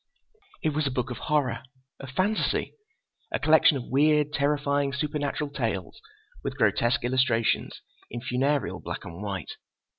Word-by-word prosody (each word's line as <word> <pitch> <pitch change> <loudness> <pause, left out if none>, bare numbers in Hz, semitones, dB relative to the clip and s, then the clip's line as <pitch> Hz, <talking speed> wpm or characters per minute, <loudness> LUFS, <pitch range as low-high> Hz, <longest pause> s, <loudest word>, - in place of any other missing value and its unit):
It 155 - +3
was 150 -1 0
a - - +1
book 125 -1 -2
of 120 - -5
horror, 135 -6 +1 0.4
of 135 - -8
fantasy. 190 +10 0 0.6
A - - +1
collection 155 -1 +5
of 125 - -5
weird, 150 +1 +3
terrifying, 145 -1 +1
supernatural 145 0 -2
tales 110 -10 -3 0.4
with - - -4
grotesque 120 +3 +2
illustrations 120 -2 +1 0.3
in 120 - -5
funereal 130 +3 0
black - - -6
and 85 +4 -8
white. 100 -4 -5
140 Hz, 140 wpm, -27 LUFS, 120-150 Hz, 0.6 s, collection